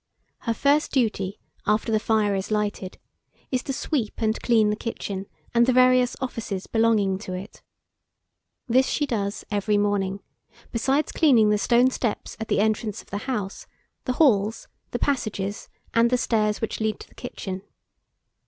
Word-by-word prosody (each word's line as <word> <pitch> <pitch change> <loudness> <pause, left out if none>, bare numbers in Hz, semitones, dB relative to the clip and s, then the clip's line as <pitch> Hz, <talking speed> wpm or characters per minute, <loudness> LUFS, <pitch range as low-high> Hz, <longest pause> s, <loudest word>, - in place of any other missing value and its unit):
Her 230 - -1
first 285 +4 +2
duty, 210 -7 0 0.3
after 215 +2 +2
the 215 - +3
fire 215 -2 +2
is 195 0 -2
lighted, 210 -3 -2 0.5
is 255 -1 +1
to 270 - -4
sweep 265 -5 -2
and 220 0 0
clean 220 -3 +3
the - - 0
kitchen, 200 -4 -5 0.3
and 235 0 +4
the 255 - +4
various 255 0 +5
offices 230 -7 -4
belonging 215 -4 +2
to 190 -3 -6
it. 190 +4 -8 1.1
This 255 +2 +4
she 295 - 0
does 205 -6 -2
every 205 0 +1
morning, 200 -1 0 0.5
besides 270 +6 +1
cleaning 235 -9 +5
the 210 - +2
stone 245 +5 +4
steps 235 -4 -3
at 220 - -4
the - - +1
entrance 215 0 -1
of - - -25
the 200 - -2
house, 210 -6 -3 0.4
the 255 - 0
halls, 225 -7 +2 0.2
the - - -2
passages, 215 -7 -2 0.2
and 230 +1 +4
the 250 - +3
stairs 215 -3 +1
which 225 - -3
lead 220 -1 -1
to - - -11
the - - -23
kitchen. 190 -6 -6
220 Hz, 160 wpm, -25 LUFS, 205-245 Hz, 1.1 s, various